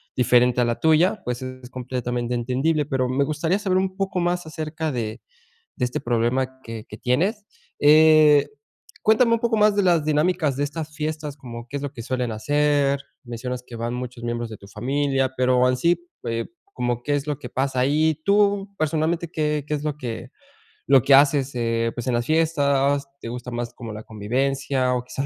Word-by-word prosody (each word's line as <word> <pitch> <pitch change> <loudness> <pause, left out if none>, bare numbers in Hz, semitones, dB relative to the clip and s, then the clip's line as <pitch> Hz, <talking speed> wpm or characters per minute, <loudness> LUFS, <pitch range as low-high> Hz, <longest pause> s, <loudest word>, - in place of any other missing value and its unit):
diferente 125 0 +3
a 120 - +3
la 120 0 -1
tuya. 160 +3 +3
Pues, 125 0 -3
es 130 -1 -8
completamente 125 -1 -3
entendible, 135 +6 0
pero 130 -3 -1
me 140 +2 +1
gustaría 160 +6 0
saber 185 -3 +1
un 190 0 -2
poco 190 -2 -1
más 175 0 -1
acerca 155 0 -4
de 110 -1 -4 0.6
de 125 - +1
este 125 - -3
problema 125 +3 0
que 115 -3 -8
que 105 - -10
tienes, 185 - 0 0.3
eh, 155 0 +6 0.5
cuéntame 230 +2 +4
un 230 - +2
poco 230 -1 +1
más 210 -1 +4
de 205 - +3
las 170 -4 +3
dinámicas 155 -1 +1
de 140 - -1
estas 150 +1 -5
fiestas, 155 -1 -4
como, 120 -4 -9
¿qué 140 - -8
es 140 - -6
lo 140 - -4
que 125 - -8
suelen 125 -1 -2
hacer? 145 +4 +1 0.3
Mencionas 120 +1 -5
que 120 - -10
van 115 +1 -3
muchos 125 -1 -6
miembros 120 -1 -3
de 110 - -7
tu 100 - -15
familia, 135 +5 -1
pero, 125 0 +3
en 125 - +2
sí, 170 +5 +2 0.3
eh, 115 0 -2 0.2
como 120 -1 -3
que 145 +2 0
es 145 +1 -3
lo 150 -2 -1
que - - -8
pasa 135 -1 -1
ahí 155 +3 +2
tú 200 0 +2
personalmente, 160 +2 0
¿qué 150 -1 -1
qué 150 - -2
es 150 -1 -2
lo 150 -1 -2
que 120 -2 -6 0.6
lo 135 - +6
que 140 - +4
haces? 140 -1 +3
Eh, 115 -1 0
pues 120 - -5
en 125 - +1
las 120 - -1
fiestas, 145 -3 +2
te 115 - -6
gusta 125 +1 -6
más 120 0 -4
como 115 -3 -8
la 105 - -8
convivencia 130 +4 -1
o 125 - -1
quizás 125 +2 -4
135 Hz, 195 wpm, -23 LUFS, 125-155 Hz, 0.6 s, eh